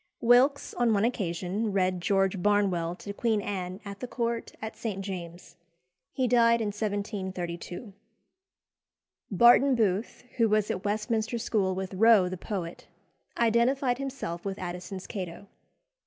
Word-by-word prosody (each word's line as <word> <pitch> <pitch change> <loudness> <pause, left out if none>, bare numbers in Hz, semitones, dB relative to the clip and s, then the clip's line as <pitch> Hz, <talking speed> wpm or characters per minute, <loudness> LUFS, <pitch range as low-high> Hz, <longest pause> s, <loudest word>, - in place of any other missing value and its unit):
Wilkes 250 +4 +4
on 240 -2 +2
one 200 +2 +2
occasion 195 -1 -2
read 185 -2 +1
"George 195 0 +1
Barnwell" 190 -5 +1
to 200 +2 -7
Queen 220 0 +1
Anne 185 -2 -4
at 200 0 -7
the 250 - -5
Court 235 -1 -2
at 220 0 -6
St. 215 -3 -4
James's. 175 -2 -8 0.5
He 260 -2 0
died 235 -1 +4
in 220 -2 -1
1732. 200 -2 -4 1.4
Barton 240 +6 +6
Booth, 215 0 -1
who 230 -2 +3
was 210 -1 +2
at 185 - -4
Westminster 220 +2 -1
School 200 -4 0
with 190 0 -4
Rowe 210 -1 +5
the 185 - -4
poet, 180 -3 -6 0.5
identified 245 +3 +2
himself 265 -11 -5
with 195 -1 -4
Addison's 180 +1 -6
Cato. 190 -2 -6
205 Hz, 135 wpm, -28 LUFS, 185-230 Hz, 1.4 s, Barton